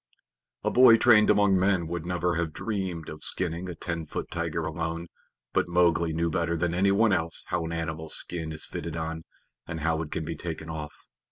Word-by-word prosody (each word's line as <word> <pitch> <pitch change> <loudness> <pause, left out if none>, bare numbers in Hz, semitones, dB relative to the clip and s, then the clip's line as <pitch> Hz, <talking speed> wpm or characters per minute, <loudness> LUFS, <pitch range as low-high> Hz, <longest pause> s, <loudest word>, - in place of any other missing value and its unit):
A - - +1
boy 125 -2 +8
trained 110 -2 +6
among 105 -2 +4
men 95 -2 +2
would 85 +1 -4
never 90 0 0
have 85 -2 -2
dreamed 95 -7 -3
of 75 - -6
skinning 90 0 -2
a 90 - -6
ten 85 -2 -4
foot - - -5
tiger - - -2
alone, 85 +1 -3 0.5
but - - +1
Mowgli 85 -1 +2
knew 85 +1 0
better 85 0 0
than 85 +1 0
anyone 100 +4 +3
else 85 -2 0
how 80 - -1
an 80 - -5
animal's 80 -1 -2
skin 80 -2 +2
is 80 - -4
fitted 85 0 -5
on, 80 0 -4 0.4
and 80 -1 -5
how 80 0 0
it 80 - -6
can 80 - -3
be 80 +1 -4
taken 80 -1 -6
off. 75 -2 -6
85 Hz, 195 wpm, -27 LUFS, 80-90 Hz, 0.5 s, boy